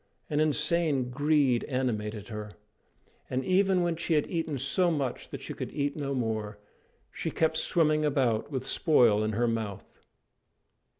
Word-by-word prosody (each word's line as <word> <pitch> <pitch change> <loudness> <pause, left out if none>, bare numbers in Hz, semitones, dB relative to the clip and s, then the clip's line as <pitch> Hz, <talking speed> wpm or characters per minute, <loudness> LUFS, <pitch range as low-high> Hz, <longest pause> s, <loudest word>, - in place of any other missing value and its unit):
An 150 - +1
insane 150 -3 +1
greed 145 -3 +2
animated 110 -5 -3
her; 105 -1 -6 0.8
and 130 +1 -2
even 190 -1 +3
when 170 -1 0
she 165 0 -1
had 150 - +2
eaten 165 -4 -3
so 140 +7 +1
much 140 -6 -3
that - - -7
she - - -6
could - - -6
eat 145 -1 -2
no 140 -2 -3
more, 110 -3 -2 0.5
she - - -4
kept 160 0 0
swimming 155 -3 +2
about 130 -7 +1
with 130 -3 -4
spoil 115 -9 +4
in 110 0 -1
her 120 +3 +1
mouth. 110 -4 -4
140 Hz, 155 wpm, -28 LUFS, 115-155 Hz, 0.8 s, spoil